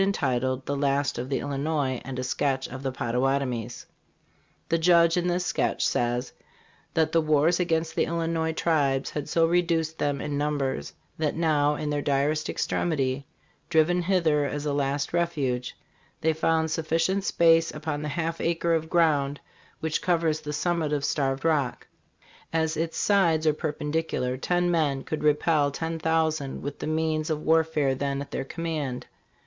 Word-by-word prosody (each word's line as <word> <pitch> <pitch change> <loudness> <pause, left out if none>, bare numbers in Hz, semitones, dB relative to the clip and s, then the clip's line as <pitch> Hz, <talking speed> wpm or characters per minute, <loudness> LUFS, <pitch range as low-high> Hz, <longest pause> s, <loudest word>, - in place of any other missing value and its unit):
entitled, 130 -9 0
"The 140 - -2
Last 140 -2 0
of 125 +2 -4
the 135 - 0
Illinois, 140 -2 -1
and 130 -1 -6
a 130 - -2
Sketch 135 +1 -1
of 130 +1 -8
the 135 -1 -2
Potta 125 -2 -2
watomies 125 -3 -1 0.4
" - - -38
The 165 - +2
Judge 170 0 +5
in 175 0 0
this 180 0 0
sketch - - 0
says 120 +1 0 0.6
that 160 -1 +2
the 165 - +3
wars 155 +3 +3
against 165 -2 0
the - - +1
Illinois 165 -1 -1
tribes 145 -5 +1
had 150 - -4
so 165 -1 +3
reduced 165 -2 +1
them 145 -1 0
in 145 -1 -3
numbers 140 - -1 0.3
that 155 -2 0
now, 150 -3 +2
in 150 0 -3
their 145 0 0
direst 145 +2 0
extremity, 140 -4 -1 0.4
driven 175 +2 +3
hither 170 -5 +2
as 145 +1 -3
a 145 - 0
last 140 +1 -1
refuge, 140 -8 -1 0.2
" - - -36
they 160 0 +2
found 160 0 +1
sufficient 165 +5 0
space 165 -2 +4
upon 150 -1 -4
the 150 - -3
half 165 +1 -2
acre 170 0 +1
of 160 -1 -1
ground 145 -5 +2 0.4
which 160 -1 -1
covers 165 -3 +1
the 150 - -5
summit 160 0 0
of 145 -1 0
Starved 135 -1 -1
Rock. 150 -6 0 0.7
As 160 0 0
its 165 +1 -2
sides 170 -6 +3
are 155 - +4
per 155 0 -2
pendicular, 150 -4 -2
ten 175 0 +1
men 145 -5 +1
could 155 - -4
repel 150 0 +3
ten 160 +3 -4
thousand 160 -3 0
with 145 0 -5
the - - -4
means 155 0 0
of 155 -1 -2
warfare 160 -3 +2
then 140 +1 -2
at 140 - -7
their - - -2
command. 155 -5 -4
155 Hz, 170 wpm, -26 LUFS, 140-165 Hz, 0.7 s, Judge